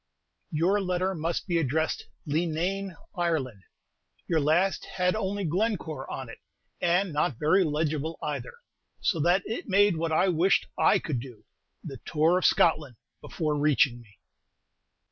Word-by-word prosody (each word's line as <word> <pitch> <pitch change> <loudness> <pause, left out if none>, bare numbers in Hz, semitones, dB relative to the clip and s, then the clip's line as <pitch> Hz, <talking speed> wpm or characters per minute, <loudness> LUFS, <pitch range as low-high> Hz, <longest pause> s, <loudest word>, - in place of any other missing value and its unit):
Your 180 +7 +1
letter 185 0 0
must 165 0 -2
be 175 -3 +1
addressed 160 +2 -1 0.2
"Leenane, 170 +5 -1 0.2
Ireland." 155 - -1 0.6
Your 165 - +1
last 160 +6 +2
had 180 0 +1
only 205 -1 -2
"Glencore" 170 -5 -2
on 130 - -5
it, 115 - -11 0.4
and 175 0 +1
not 145 -4 0
very 165 +8 +3
legible 155 0 -1
either, - - -4 0.5
so 170 - 0
that 175 +5 +3
it 225 - -5
made 200 -2 +4
what 165 0 -1
I 160 +4 +3
wished 180 +2 +3
I - - +4
could 140 -6 -3
do, 120 -3 -11 0.4
"the 135 - -7
tour 165 +4 +2
of - - -2
Scotland," 150 -6 +3 0.3
before 155 -3 -2
reaching 140 -4 +2
me. 105 -3 -21
165 Hz, 145 wpm, -27 LUFS, 150-185 Hz, 0.6 s, made